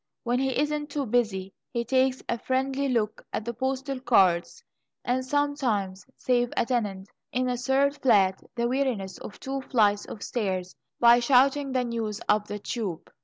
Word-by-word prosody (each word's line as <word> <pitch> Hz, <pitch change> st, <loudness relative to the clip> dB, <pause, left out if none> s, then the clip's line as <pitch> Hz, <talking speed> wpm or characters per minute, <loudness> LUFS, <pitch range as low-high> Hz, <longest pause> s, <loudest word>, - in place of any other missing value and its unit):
When 245 Hz, +1 st, 0 dB
he 265 Hz, -1 st, 0 dB
isn't 295 Hz, 0 st, -1 dB
too 285 Hz, -1 st, -2 dB
busy, 210 Hz, -5 st, 0 dB, 0.2 s
he 235 Hz, -1 st, -2 dB
takes 260 Hz, +1 st, +1 dB
a 235 Hz, -, -1 dB
friendly 265 Hz, +2 st, 0 dB
look 220 Hz, -4 st, -1 dB
at 215 Hz, -, -3 dB
the 235 Hz, -, -3 dB
postal 265 Hz, +2 st, -2 dB
cards, 195 Hz, -, +2 dB, 0.4 s
and 255 Hz, +1 st, 0 dB
sometimes 255 Hz, -9 st, -1 dB
saves 245 Hz, -1 st, +1 dB
a -, -, +3 dB
tenant 205 Hz, -6 st, -2 dB, 0.2 s
in 255 Hz, +1 st, 0 dB
a 250 Hz, -, 0 dB
third 270 Hz, +3 st, +1 dB
flat 195 Hz, -7 st, +4 dB
the 235 Hz, 0 st, 0 dB
weariness 245 Hz, -7 st, -1 dB
of -, -, -10 dB
two 270 Hz, 0 st, -4 dB
flights 210 Hz, -6 st, +2 dB
of 210 Hz, -, -8 dB
stairs 185 Hz, -6 st, -2 dB, 0.2 s
by 240 Hz, 0 st, +7 dB
shouting 270 Hz, +3 st, +3 dB
the 255 Hz, -1 st, +1 dB
news 225 Hz, -3 st, -3 dB
up 210 Hz, 0 st, +2 dB
the 205 Hz, -, -4 dB
tube! 205 Hz, -5 st, -5 dB
245 Hz, 170 wpm, -27 LUFS, 210-265 Hz, 0.4 s, by